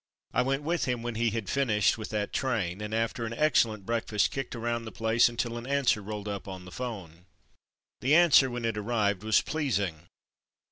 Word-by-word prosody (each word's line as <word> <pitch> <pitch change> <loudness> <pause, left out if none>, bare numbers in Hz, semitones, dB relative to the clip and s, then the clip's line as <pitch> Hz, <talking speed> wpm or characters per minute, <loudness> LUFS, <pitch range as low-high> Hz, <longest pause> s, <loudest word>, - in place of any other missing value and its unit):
I - - +3
went 135 +3 0
with 170 +3 0
him 125 -2 -2
when 120 0 -3
he 115 +1 +1
had 110 -2 -4
finished 110 -8 +2
with 110 -1 -7
that 105 -2 -2
train, 105 -8 -1
and 105 0 -5
after 115 +1 -1
an 115 0 -3
excellent 115 -7 +2
breakfast 115 -2 0
kicked 135 -2 -4
around 115 0 -2
the 110 - -7
place 115 +2 +3
until 120 0 -3
an 120 - -9
answer 135 -6 +2
rolled 105 0 -6
up 100 -1 -5
on 95 -2 -7
the 90 - -11
'phone. 95 -9 -7 0.7
The 140 +4 +3
answer, 160 -6 +6
when 120 -1 -4
it 110 -2 -1
arrived, 105 -3 0
was 110 -1 +4
pleasing. 100 - -2
115 Hz, 195 wpm, -28 LUFS, 105-125 Hz, 0.7 s, answer